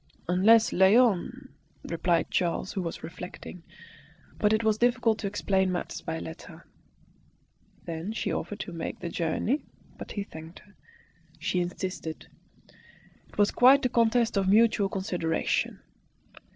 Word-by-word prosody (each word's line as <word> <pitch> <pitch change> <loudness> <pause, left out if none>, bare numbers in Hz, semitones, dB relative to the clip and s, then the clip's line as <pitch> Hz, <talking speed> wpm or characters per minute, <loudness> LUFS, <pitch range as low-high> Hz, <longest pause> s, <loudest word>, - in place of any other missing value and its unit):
"Unless 215 +6 +5
Léon 195 +1 +3 0.2
" - - -36
replied 170 0 0
Charles, 180 +1 -1
who 190 - -2
was 170 -2 -5
reflecting. 180 +1 -9 0.8
But 210 - +3
it 220 +1 +2
was 220 -1 +1
difficult 240 -2 +2
to 205 - -2
explain 190 -2 0
matters 180 - -4
by 160 -1 -4
letter. 160 +1 -10 1.2
Then 170 +4 -4
she 225 - -2
offered 205 - -4
to 180 - -7
make 165 -1 -5
the 170 - -5
journey, 175 - -1 0.4
but - - -8
he 205 - -3
thanked 160 -2 -11
her. 205 - -22 0.6
She 180 - -1
insisted. 175 -2 -5 1.0
It - - -19
was 205 -1 +3
quite 260 +2 +6
a - - +3
contest 230 -2 +2
of 190 -1 +1
mutual 215 -1 +4
consideration. 180 -4 -1
190 Hz, 140 wpm, -27 LUFS, 175-220 Hz, 1.2 s, quite